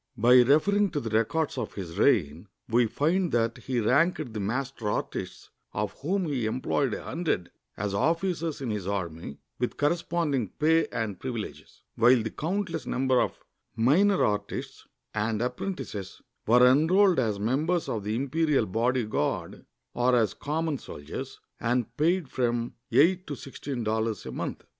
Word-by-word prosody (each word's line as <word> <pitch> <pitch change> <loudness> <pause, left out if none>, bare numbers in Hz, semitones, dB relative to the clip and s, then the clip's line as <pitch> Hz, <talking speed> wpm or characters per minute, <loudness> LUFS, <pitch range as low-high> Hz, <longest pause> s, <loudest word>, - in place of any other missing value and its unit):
By 125 +3 +7
referring 195 +11 +3
to 150 - 0
the 115 -5 -5
records 115 +8 0
of - - -5
his 85 -4 -6
reign, 75 +8 +2 0.2
we 120 +1 +3
find 170 - +1
that 115 0 +1
he 125 +1 -2
ranked 140 +3 +2
the 110 - -4
master 120 +2 -2
artists, - - -4 0.2
of 105 0 -2
whom 185 +6 0
he 130 -8 -1
employed 130 +1 0
a - - -7
hundred, 160 - -2 0.3
as 100 0 -2
officers 165 - 0
in 125 -4 -2
his 100 -3 -3
army 85 -7 -4 0.2
with 125 - -2
corresponding 155 - 0
pay 160 +2 +3
and 105 -5 -4
pri\ 130 - -4
ileges, 115 -4 -7 0.2
while 120 +2 +6
the 110 - -4
countless 170 -1 -3
numbers 130 -1 +2
of - - -11 0.3
minor 170 - +4
artists 105 -1 -3 0.3
and 110 0 -1
apprentices 125 - -4 0.3
were 125 +3 +6
enrolled 165 +7 +5
as 110 -5 0
members 150 - 0
of 110 -3 -3
the 105 +2 -2
Imperial 140 +1 +1
Bodyguard, 115 - -1 0.3
or 125 +1 +2
as 115 -3 +2
common 155 -1 -2
soldiers, 75 0 -8 0.2
and 120 0 -1
paid 170 +1 +1
from 120 -2 -1 0.2
eight 180 +5 +4
to 145 - -4
sixteen 135 -1 -6
dollars 110 -1 -1
a - - -5
month. - - -5
125 Hz, 150 wpm, -27 LUFS, 110-160 Hz, 0.3 s, By